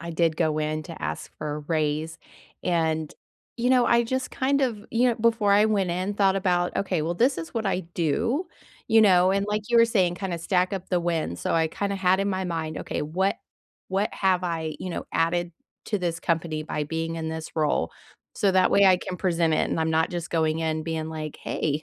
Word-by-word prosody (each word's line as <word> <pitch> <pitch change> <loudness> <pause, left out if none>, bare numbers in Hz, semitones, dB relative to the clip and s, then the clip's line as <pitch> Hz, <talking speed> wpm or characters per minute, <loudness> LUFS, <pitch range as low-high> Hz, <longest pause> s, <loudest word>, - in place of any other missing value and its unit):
I 170 -1 -6
did 165 -1 +1
go 155 -2 +1
in 155 0 -1
to 165 -1 -9
ask - - -4
for 150 -1 -3
a - - -4
raise, 155 +1 -1 0.4
and, 160 -3 0 0.4
you 245 +1 0
know, 250 -2 +5
I 235 0 +4
just, 260 +2 -2
kind 275 +2 +1
of, 225 -5 -2
you 240 +2 +3
know, 240 - +1
before 225 -3 +2
I 205 +1 +5
went 200 -4 +1
in, 185 +4 -2
thought 195 -1 +3
about, 180 -2 +1
"Okay, 185 -5 0
well, 165 +3 -1
this 245 +9 +2
is 165 - -7
what 225 -2 -1
I 190 -1 0
do" 230 - 0 0.4
you 225 - +6
know, 185 -3 +5
and, 200 +1 +1
like, 210 0 -1
you 235 - +4
were 230 - +8
saying, 185 -6 +1
kinda 185 -2 -3
stack 180 +3 0
up 190 -2 -4
the 180 - +2
wins, 165 - -2
so - - -1
I 160 -1 +2
kinda 200 +4 -2
had 190 -1 +2
in 200 +1 0
my 190 -1 -1
mind, 160 -3 -3
"Okay, - - -3
what 185 +6 0 0.5
what 195 +2 0
have 185 -2 +1
I, 160 -3 -3
you 185 - -5
know, 170 - -4
added 170 +1 0 0.3
to 210 - -1
this 170 -2 -2
company 165 -2 -1
by 150 -1 -3
being 165 +2 -3
in 160 -1 -3
this 160 0 -6
role?" 155 -2 +1 0.4
so 200 -2 +2
that 185 0 +4
way 200 - +5
I 185 -1 +6
can 180 0 -6
present 170 -3 +1
it, - - +1
and - - -1
I'm 160 0 +1
not 160 0 +2
just 175 -1 -5
going 160 -1 +1
in 160 -1 -1
being 160 -1 -3
like, 155 -2 -6
"Hey, 150 0 -2
175 Hz, 225 wpm, -25 LUFS, 160-200 Hz, 0.5 s, were